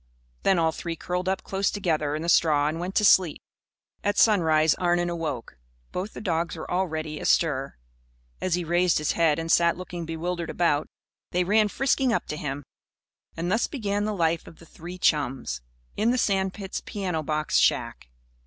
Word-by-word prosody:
Then 190 - +3
all 165 -1 +2
three 165 +1 -5
curled 180 +3 -2
up 190 - -1
close 195 +1 0
together 155 -7 -1
in 155 - -4
the - - -4
straw 150 -4 +4
and 155 +2 -2
went 180 +2 -4
to 210 - +4
sleep. 185 -5 +5 0.6
At 205 0 0
sunrise 160 -7 +4
Arnon 175 -1 +1
awoke. 150 - -5 0.3
Both 190 +4 -4
the - - -8
dogs 170 -3 -1
were 160 - -7
already 160 -4 -2
astir. 140 -5 +1 0.7
As 185 -2 +1
he 175 - -2
raised 175 +1 +2
his 150 -1 0
head 160 -3 +2
and 165 0 -2
sat 170 0 +4
looking 175 -2 -6
bewilderedly 170 +1 -3
about, 150 -4 +1 0.4
they 180 +1 +1
ran 210 +3 +3
frisking 265 +3 +1
up 230 - 0
to - - -2
him. 145 -1 -4 0.7
And 170 +2 -2
thus 225 +4 +2
began 205 -5 -2
the 215 -1 -2
life 165 -2 0
of 165 - -13
the 165 - -15
three 175 +3 -9
chums 135 - 0 0.3
in 220 - +1
the 250 - +2
sand 190 -4 +1
pit's 195 -2 -5
piano 185 -6 -3
box 155 0 0
shack. - - +1
170 Hz, 180 wpm, -26 LUFS, 155-190 Hz, 0.7 s, sleep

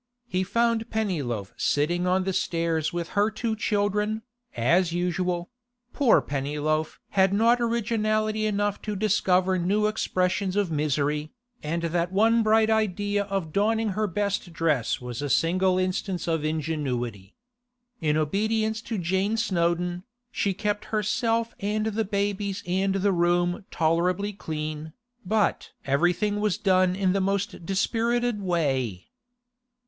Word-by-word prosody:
He 185 -5 0
found 230 +3 +1
Pennyloaf 145 - -2
sitting 175 +5 +1
on 185 +1 +2
the 190 0 -1
stairs 165 -3 0
with 170 -1 -4
her 205 +1 +2
two 220 +1 -2
children, 210 +1 0 0.3
as 165 +9 +3
usual; 175 +1 -1 0.4
poor 275 -6 +4
Pennyloaf 150 +3 -2
had 190 -1 +3
not 230 +4 +3
originality 215 -2 0
enough 205 -1 -1
to 210 -1 -4
discover 185 -2 +2
new 200 +5 +1
expressions 190 -2 0
of 200 -4 +1
misery, 150 0 0 0.3
and 165 +3 -2
that 170 +1 0
one 225 +4 +4
bright 220 0 +3
idea 205 -1 0
of 195 -6 -3
donning 220 +2 +1
her 210 +2 -1
best 200 -1 -2
dress 155 -8 0
was 125 +1 -6
a 145 - -2
single 185 +6 +2
instance 185 0 -2
of 160 -2 0
ingenuity. 135 -10 -3 0.6
In 150 -1 +1
obedience 220 +7 0
to 225 -1 -4
Jane 190 +5 0
Snowdon, 175 -4 0 0.3
she 195 -2 0
kept 205 +1 -2
herself 225 +2 0
and 210 +2 -1
the 220 0 -1
babies 200 -1 -2
and 190 +2 0
the 195 +1 +2
room 175 +1 +1
tolerably 180 +5 +1
clean, 155 -3 -5 0.3
but 210 +2 0
everything 175 +9 +1
was 210 -2 +1
done 185 -3 +3
in 190 -1 +1
the 195 - +1
most 195 -2 -2
dispirited 230 +3 0
way. 135 - -1
190 Hz, 135 wpm, -26 LUFS, 165-210 Hz, 0.6 s, poor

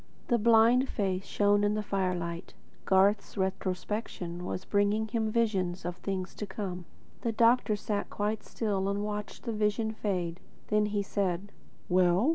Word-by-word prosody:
The 240 -2 +3
blind 235 +4 +5
face 190 -2 -1
shone 205 0 +3
in 205 +1 +2
the 215 - -1
firelight. 180 -4 -2 0.3
Garth's 200 +3 +3
retrospection 190 -1 -3
was 185 - -4
bringing 205 +2 +2
him 220 -1 -1
visions 195 -6 0
of 175 0 -3
things 190 -1 -3
to 210 - -4
come. 185 -4 -5 0.4
The 230 - 0
doctor 230 0 +4
sat 205 0 -3
quite 210 +1 -1
still 200 -4 -1
and 200 +1 -1
watched 210 0 -5
the 230 - -2
vision 215 +1 0
fade. 180 -5 -2 0.3
Then 210 0 +3
he 205 -1 -1
said: 195 -1 -2 0.4
"Well?" 180 - +4
205 Hz, 150 wpm, -30 LUFS, 185-215 Hz, 0.4 s, blind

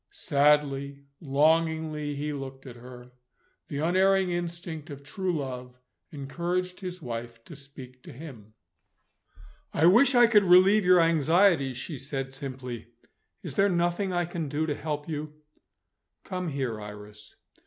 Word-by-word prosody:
Sadly, 140 -1 +1 0.2
longingly, 155 0 +1
he 150 +1 -3
looked 135 -1 -8
at 125 -2 -9
her. 125 0 -12 0.6
The 140 - -5
unerring 185 +4 +2
instinct 170 -2 -5
of 140 -1 -9
true 180 +3 -2
love 125 -3 -6 0.3
encouraged 175 +6 -3
his 180 -3 -7
wife 115 -1 -7
to 165 - -11
speak 135 -2 -12
to - - -12
him. 120 -7 -12 1.2
"I 155 - +2
wish 245 +10 +6
I 240 0 +8
could 210 -4 +4
relieve 185 +3 +6
your 180 -1 +6
anxieties," 165 -3 +3
she 135 +2 -6
said 135 -1 -5
simply. 130 -4 -7 0.6
"Is - - -6
there 200 +1 +3
nothing 175 +2 0
I 175 -1 0
can 165 -3 -4
do 150 +3 -1
to 155 - -1
help 150 0 -4
you?" 150 -1 -5 0.9
"Come 180 -2 -4
here, 130 -7 -3
Iris." 105 0 -11
150 Hz, 140 wpm, -27 LUFS, 135-175 Hz, 1.2 s, I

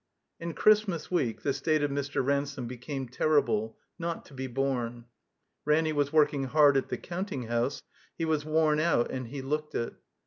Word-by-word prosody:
In 170 -1 -5
Christmas 210 -7 +3
week 125 -11 0
the 140 - +1
state 150 +2 +1
of 145 - 0
Mr. 140 -1 -1
Ransome 140 -1 -1
be 125 +2 -6
came 135 +1 -5
terrible, 120 -5 +1 0.2
not 170 0 -3
to - - -16
be 130 0 -4
borne. 120 -2 -2 0.6
Ranny 155 +1 +2
was 145 -1 +1
working 150 -3 +3
hard 145 +1 +5
at 135 - +1
the - - -2
counting 180 -6 -4
house; 120 +4 -1 0.3
he 165 - -1
was 155 -2 +1
worn 155 0 +2
out, 155 -7 +2
and 130 -2 -4
he 135 +3 -6
looked 150 +3 -3
it. 115 - -2
140 Hz, 180 wpm, -29 LUFS, 130-155 Hz, 0.6 s, hard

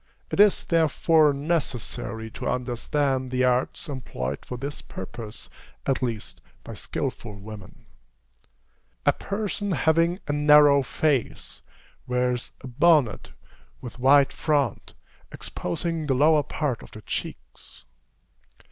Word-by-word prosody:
It - - -2
is, 205 -1 +5
therefore, 160 -1 +3
necessary 140 - -3
to - - -4
understand 130 +2 -1
the 130 0 0
arts 125 +5 +1
employed 70 - -5
for 125 - -6
this 140 +4 -6
purpose, 105 +3 -8 0.4
at 135 -1 0
least 115 -4 -4 0.2
by - - -8
skilful 105 -3 -4
women. 100 0 -11 1.2
A - - +5
person 205 -1 -3
having 165 +4 +2
a 145 - 0
narrow 145 -1 +6
face, 135 -1 -1 0.5
wears 125 -1 -1
a - - -8
bonnet 145 -2 +3 0.5
with 125 0 -9
wide 135 +2 +5
front, 145 -7 -1 0.4
exposing 160 - -4
the 135 - +2
lower 150 +3 +5
part 140 -3 -3
of - - -12
the 110 - -12
cheeks. - - -7
135 Hz, 115 wpm, -25 LUFS, 120-155 Hz, 1.2 s, narrow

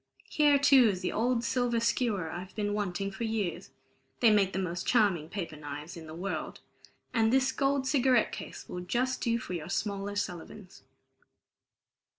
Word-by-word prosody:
Here, 295 -2 +5
too, 275 -4 +6
is 185 -3 -2
the 185 - -1
old 235 +1 +1
silver 245 -1 +1
skewer 225 -7 0
I've 185 +2 -7
been 205 -1 -1
wanting 200 -1 -2
for 195 +4 -6
years 220 -6 -2 0.5
they 230 -3 +6
make 200 -2 +3
the - - -4
most 180 -2 -3
charming 195 -10 +2
paper 170 -6 -5
knives 150 +2 -7
in 165 -2 -10
the 155 - -8
world 190 +4 -4 0.5
and 225 -1 +3
this 265 0 +3
gold 275 0 0
cigarette 260 -4 +3
case - - -8
will 180 - -5
just 250 +8 -1
do 230 -1 +1
for 185 - -6
your 165 -3 -5
smaller 200 -1 -2
Sullivans." 185 0 -6
205 Hz, 165 wpm, -30 LUFS, 180-240 Hz, 0.5 s, too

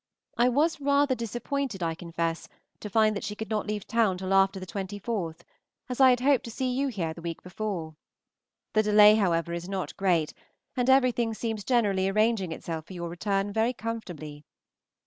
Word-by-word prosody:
I 240 +1 +4
was 295 +5 +1
rather 280 -1 +3
disappointed, 240 -1 -3
I 165 -1 0
confess, 165 0 -3 0.3
to 210 - -7
find 215 +1 +3
that 200 - -4
she 210 +1 -4
could 220 0 -6
not 215 -1 -1
leave 210 -1 -3
town 220 -5 +1
till 190 +1 -2
after 195 0 +3
ye 185 - -7
24th, 195 -2 -4 0.5
as 250 +1 -2
I 260 - +9
had 245 -1 +3
hoped 275 -1 +3
to - - -6
see 255 +2 -2
you 270 +3 0
here 180 -10 -3
the 170 - -11
week 165 -1 -6
before. 180 -4 -4 0.8
The 215 - +4
delay, 210 0 +7
however, 170 -5 +1
is 170 +2 -5
not 190 -6 -4
great, 175 -5 +1 0.4
and 250 0 +1
everything 245 -4 +3
seems 220 -2 -3
generally 200 -6 +2
arranging 215 -3 +1
itself 160 -1 -5
for - - -10
your 170 -1 -5
return 195 +3 -1
very 225 +3 +1
comfortably. 175 - -6
210 Hz, 185 wpm, -27 LUFS, 180-235 Hz, 0.8 s, I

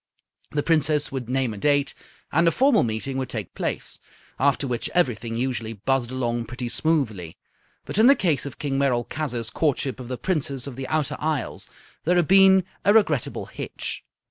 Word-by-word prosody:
The 145 -1 -1
Princess 155 -2 +2
would 130 -3 -5
name 130 -3 0
a 105 - -8
date, 145 +3 +2 0.4
and 165 +3 +3
a - - +5
formal 265 0 +4
meeting 120 +4 -2
would 130 - -3
take 105 -6 -4
place; - - -3 0.4
after 140 +1 +2
which 125 -3 -2
everything 120 - +1
usually 115 -2 -2
buzzed 120 +3 0
along 120 -2 -2
pretty 125 +1 -5
smoothly. 115 - 0 0.5
But - - -2
in 225 - +7
the 280 - +8
case 150 - 0
of 125 - -9
King 140 -2 -2
Merolchazzar's 125 -2 -1
courtship 140 -5 0
of 125 - -7
the 125 0 -4
Princess 140 -7 -1
of 140 -3 -7
the 130 0 -5
Outer 155 -3 -1
Isles 155 -2 -2 0.3
there 175 +3 +2
had 175 -3 +3
been 190 0 +6 0.2
a 205 +2 +4
regrettable 160 - +2
hitch. - - -4
135 Hz, 175 wpm, -24 LUFS, 120-155 Hz, 0.5 s, the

